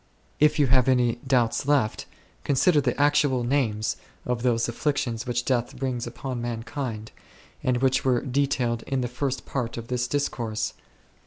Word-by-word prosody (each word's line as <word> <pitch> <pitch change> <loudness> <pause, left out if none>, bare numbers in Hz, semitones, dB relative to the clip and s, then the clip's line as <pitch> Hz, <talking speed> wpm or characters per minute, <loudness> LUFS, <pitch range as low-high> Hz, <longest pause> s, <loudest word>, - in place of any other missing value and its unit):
If 150 +2 +4
you 145 - +4
have 130 0 +4
any 125 -2 +2
doubts 125 0 +2
left, 140 -7 +1 0.4
consider 145 +3 +3
the 140 - -1
actual 145 -3 +3
names 120 -5 0 0.3
of 125 -1 -1
those 120 -2 +2
afflictions 120 -2 -1
which 120 0 -1
death 125 -2 0
brings 125 -2 -2
upon 125 +1 -5
man 120 -1 -3
kind, 115 -6 -5 0.5
and 125 -1 +2
which 130 0 +3
were 125 -2 +2
detailed 130 -3 0
in 135 -2 0
the 125 - -1
first 130 +2 -3
part 120 -4 -3
of 115 0 -7
this 125 0 0
discourse. 120 -6 -2
125 Hz, 160 wpm, -26 LUFS, 120-135 Hz, 0.5 s, If